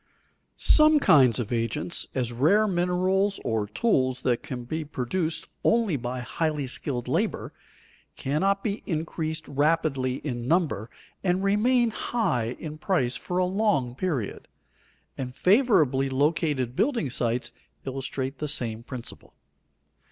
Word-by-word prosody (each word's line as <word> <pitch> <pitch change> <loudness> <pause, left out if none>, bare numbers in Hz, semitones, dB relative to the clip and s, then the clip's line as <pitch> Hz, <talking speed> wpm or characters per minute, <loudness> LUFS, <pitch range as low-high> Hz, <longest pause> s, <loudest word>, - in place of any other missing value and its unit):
Some 305 0 +6
kinds 130 - +5
of 120 -1 -3
agents, 115 +9 -1
as 120 -2 -1
rare 195 - +3
minerals 185 +2 +1
or 110 -2 0
tools 130 - +1
that 120 -2 +1
can 125 -2 -6
be 155 +6 -3
produced 155 +4 -2 0.2
only 225 -7 +2
by 125 -1 -4
highly 150 +3 -2
skilled 130 -1 -3
labor, - - -1 0.6
cannot 195 +8 0
be 205 -1 -2
increased 160 -1 -3
rapidly 145 -3 +1
in 120 -4 -4
number 140 - +1 0.3
and 185 0 +1
remain 230 +4 +3
high 125 - -1
in 155 -1 -7
price 130 -10 0
for 180 +7 -4
a 185 - +3
long 185 - +1
period; 135 - -3 0.7
and 125 -1 -5
favorably 165 - +3
located 140 -2 0
building 230 - 0
sites 120 -1 -1 0.3
illustrate 135 0 -4
the 150 - -2
same 115 -5 -1
principle. 120 0 -9
150 Hz, 125 wpm, -26 LUFS, 125-185 Hz, 0.7 s, Some